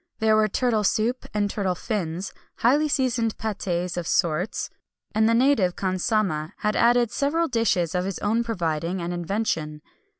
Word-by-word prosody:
There 220 -1 +3
were 215 0 +4
turtle 220 0 +1
soup, 230 +5 0
and 205 -1 0
turtle 195 -3 -1
fins; 185 -3 -3 0.2
highly 290 +6 +3
seasoned 250 -5 0
pâtés 180 -5 -3
of 175 -2 -3
sorts; 175 +2 0 0.4
and 220 +1 +3
the 230 - +3
native 230 -8 +3
khansamah 185 -4 -1
had 210 0 -1
added 240 0 +3
several 320 +6 +1
dishes 210 - +1
of 180 0 0
his 195 -1 -3
own 225 +3 0
providing 175 -5 -2
and 175 0 -3
invention. 170 -4 -2
210 Hz, 155 wpm, -24 LUFS, 175-230 Hz, 0.4 s, were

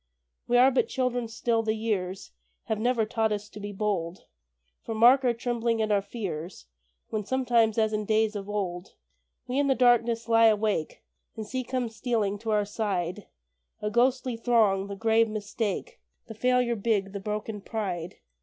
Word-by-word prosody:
We 245 - +3
are 255 +2 +6
but 260 - +2
children 245 -2 -1
still, 225 0 0
the 220 -1 -1
years 195 - -3 0.3
Have 220 - -2
never 235 -1 +1
taught 220 0 0
us 205 0 -3
to 210 - -10
be 205 0 -6
bold, 190 -4 -3 0.6
For 225 - -4
mark 245 +5 +6
our 250 - +3
trembling 235 -1 -1
and 215 -1 0
our 200 -1 +3
fears 185 - -6 0.5
When 215 -1 -2
sometimes, 235 -2 +2
as 220 -1 +2
in 215 0 -1
days 220 0 +1
of 200 0 -5
old, 185 -4 -4 0.5
We 255 +3 -1
in 285 - +2
the 270 - +3
darkness 235 -2 +3
lie 230 0 +6
awake, 210 -6 0 0.3
And 220 - -5
see 255 +4 -3
come 250 0 -2
stealing 220 -3 -1
to 225 +1 -5
our 210 -1 +2
side 200 -3 -3 0.5
A 210 - -3
ghostly 250 +1 +2
throng 220 -5 +2
the 200 - -6
grave 225 +2 +2
Mistake, 215 - -4 0.3
The 225 - -9
Failure 250 +1 +1
big, 205 -2 0
the 200 - -5
broken 210 +1 -4
Pride. 185 -6 -4
220 Hz, 175 wpm, -27 LUFS, 205-235 Hz, 0.6 s, are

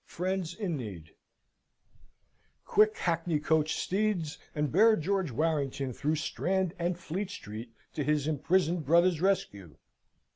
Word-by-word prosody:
Friends 180 -1 -2
in 185 -8 -2
Need 90 - -8 1.5
Quick, 215 0 +4
hackneycoach 160 -2 +1
steeds, 190 -6 -1 0.2
and 150 -3 0
bear 220 +6 +6
George 190 0 0
Warrington 140 -1 -1
through 150 +6 0
Strand 185 +3 -1
and 175 0 0
Fleet 180 +3 -4
Street 115 - -8 0.2
to 150 - -2
his 150 0 +1
imprisoned 165 +3 +1
brother's 170 +2 +3
rescue! 100 - -1
165 Hz, 115 wpm, -30 LUFS, 145-185 Hz, 1.5 s, bear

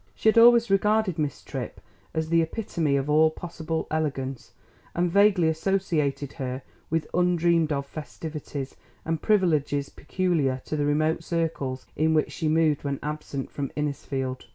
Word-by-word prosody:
She 220 - +3
had 220 - +2
always 235 -1 +7
regarded 200 -3 +2
Miss 145 -3 -2
Tripp - - -6 0.3
as 160 0 -2
the 165 0 +4
epitome 165 -4 -1
of 135 0 0
all 155 +1 +5
possible 160 -1 -4
elegance, 135 -5 -2 0.4
and 175 0 +1
vaguely 200 -3 +4
associated 160 -5 0
her 130 0 -3 0.3
with 160 -1 0
undreamed 170 -2 +2
of 140 -1 -1
festivities 150 -1 -6 0.3
and 165 -1 -1
privileges 155 -9 +2
peculiar 155 -6 0
to - - -3
the 145 -1 0
remote 155 +3 +1
circles 155 -6 -2
in 160 +1 +2
which 155 - +1
she 160 - -2
moved 155 -1 +2
when 140 -1 -2
absent 150 -2 -4
from 140 -2 -3
Innisfield. 135 -3 -3
155 Hz, 150 wpm, -26 LUFS, 145-170 Hz, 0.4 s, always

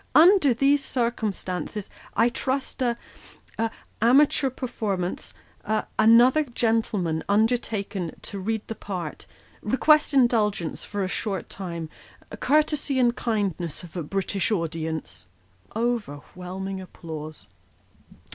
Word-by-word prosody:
Under 330 -2 +7
these 275 +3 +3
circumstances, 210 - -2 0.3
I 230 +3 +5
trust 265 +2 -3
a 240 -2 +1 0.6
a 225 0 +2 0.3
amateur 270 +3 +5
performance 210 -8 -3 0.3
a 215 +1 0
another 240 +7 +6
gentleman 220 - 0
undertaken 210 -4 0
to 200 - -5
read 220 +2 -2
the - - -3
part 180 -7 -6 0.3
request 300 +8 +4
indulgence 215 -9 +2
for 205 -1 -3
a - - 0
short 195 -1 -3
time 170 -4 -5 0.5
courtesy 300 -2 +2
and 240 -2 +3
kindness 190 -8 -2
of 175 -1 -12
a 175 - -2
British 195 +5 -1
audience." 160 - -3 0.5
Overwhelming 190 -3 -3
applause. 155 -4 -8
215 Hz, 105 wpm, -25 LUFS, 180-245 Hz, 0.6 s, Under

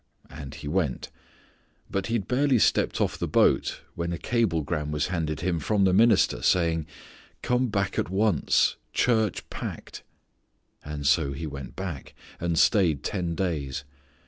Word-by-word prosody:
And 70 0 -8
he 75 +1 -8
went, 75 -5 -1 0.8
but 100 -1 -2
he 115 - -1
had 105 -5 -2
barely 135 +1 +2
stepped - - +2
off - - 0
the - - -1
boat - - +2
when 85 0 -3
a 85 - -2
cablegram 80 - -1
was 75 +2 -1
handed 80 -5 -2
him 85 -1 0
from 100 +5 +1
the 95 -1 +4
minister 110 +1 +4
saying, 80 -3 +2 0.6
"Come 125 +1 +1
back 100 -3 -1
at - - -1
once. 95 -3 +2 0.2
Church 110 -5 +1
packed." - - -7 1.0
So 70 0 +2
he 70 +4 -5
went 70 -4 -7
back, 90 -8 -6 0.2
and 85 -1 -1
stayed 85 -8 +3
ten 85 -1 -2
days. 70 -8 -2
85 Hz, 145 wpm, -26 LUFS, 75-100 Hz, 1.0 s, the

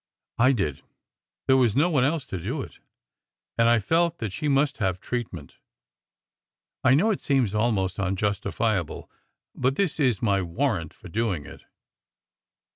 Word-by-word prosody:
I 130 +3 +6
did. 80 - -1 0.6
There 130 - +5
was 120 -5 +3
no 150 +6 +4
one 145 -8 +2
else 150 +2 0
to 95 - -5
do - - -3
it, - - -13 0.8
and 115 0 +4
I 120 - +5
felt 165 - +1
that 105 -5 -4
she 125 +10 -3
must 140 0 +2
have 95 -4 0
treatment. 105 - -5 1.2
I 130 0 +5
know 205 +10 +3
it 200 - -2
seems 130 -8 +1
almost 105 -4 0
unjus 100 +1 -1
tifiable, 100 -4 -2 0.4
but 130 +1 0
this 180 -3 0
is 125 -9 +2
my 100 -4 +1
warrant 90 - -1
for - - -14
doing 95 -5 -1
it." - - -13
115 Hz, 155 wpm, -25 LUFS, 95-135 Hz, 1.2 s, I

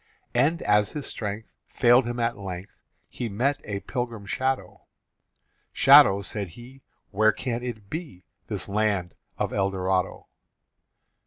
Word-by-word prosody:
And, 145 +7 +2
as 105 0 +2
his 150 -2 -4
strength 105 0 -5
Failed 120 0 +4
him 120 0 -3
at 115 0 0
length, 95 -1 -7 0.4
He 120 - -5
met 130 +8 0
a 100 -2 -4
pilgrim 120 -5 -4
shadow 130 +5 -3 0.9
"Shadow," 100 +1 +7
said 100 +1 -3
he, 130 +3 -13 0.3
"Where 110 +1 +4
can 115 +3 -4
it 115 -5 -6
be 150 - -7 0.2
This - - -4
land 100 -4 0 0.2
of - - -2
Eldorado?" 95 -1 -1
110 Hz, 130 wpm, -26 LUFS, 100-125 Hz, 0.9 s, Shadow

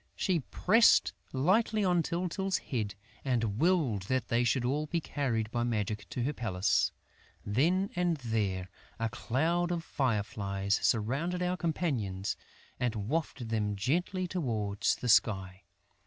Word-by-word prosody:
She 180 -3 +1
pressed 215 - +4 0.2
lightly 205 - +2
on 175 -2 +3
Tyltyl's 180 +3 -1
head 105 -7 -3 0.3
and 115 -5 0
willed 155 - +2
that 130 -1 0
they 120 +1 +2
should 120 +1 +1
all 145 +4 0
be 170 +3 0
carried 120 -8 -2
by 120 0 0
magic 105 -4 -2
to 125 - -2
her 145 +4 0
palace. 100 -8 +1 0.5
Then 170 - +2
and 175 -2 +1
there, 100 -7 -2 0.3
a 115 -1 -1
cloud 160 +9 0
of 170 -2 -2
fireflies 100 -7 -1
surrounded 140 +11 0
our 180 0 0
companions 130 - -1 0.4
and 120 -2 0
wafted 120 +2 -2
them 105 -2 0
gently 175 - 0
towards 110 - 0
the 125 - -5
sky. 95 -4 +2
125 Hz, 135 wpm, -31 LUFS, 105-170 Hz, 0.5 s, pressed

